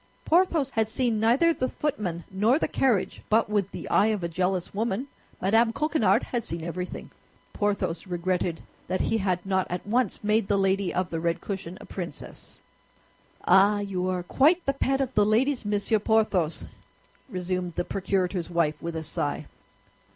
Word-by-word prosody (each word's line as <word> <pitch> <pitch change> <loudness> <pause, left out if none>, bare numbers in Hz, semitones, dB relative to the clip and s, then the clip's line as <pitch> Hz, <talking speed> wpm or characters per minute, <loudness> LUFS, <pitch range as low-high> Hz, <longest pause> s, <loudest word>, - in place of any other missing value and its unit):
Porthos 330 -5 +3
had 220 -2 0
seen 230 -1 +1
neither 250 +10 +4
the 255 -4 -2
footman 190 - -3
nor 215 +8 +3
the - - 0
carriage, 245 -8 0
but 220 0 +2
with 200 -2 +1
the - - -7
eye 210 - +4
of 215 -4 -1
a - - 0
jealous 180 +1 -1
woman, 220 +3 -1 0.3
Mme. 225 +4 +3
Coquenard 305 -4 +2
had 240 -2 -3
seen 165 -3 -5
everything. 180 +2 -5 0.4
Porthos 200 -3 -1
regretted 175 -1 -1 0.2
that 185 - -1
he 225 - +1
had 185 -2 -1
not 190 -1 0
at 180 0 -4
once 230 +1 0
made 210 0 +2
the 200 - +2
lady 195 -1 +1
of 185 0 -2
the 165 - -2
red 170 +1 0
cushion 190 -3 -6
a - - -11
princess. 175 -5 -8 0.9
"Ah, 195 +3 +5
you 185 -2 -2
are 180 -1 -1
quite 315 - +3
the 275 - +1
pet 270 0 0
of 265 -1 -2
the 210 - +4
ladies, 240 +5 +2
Monsieur 205 +1 +1
Porthos!" 205 -7 +1 0.6
resumed 180 -3 -3
the - - -1
procurator's 185 -2 -1
wife, 170 -3 0
with 170 0 -4
a 160 - -3
sigh. 145 -1 -3
200 Hz, 170 wpm, -26 LUFS, 180-225 Hz, 0.9 s, Ah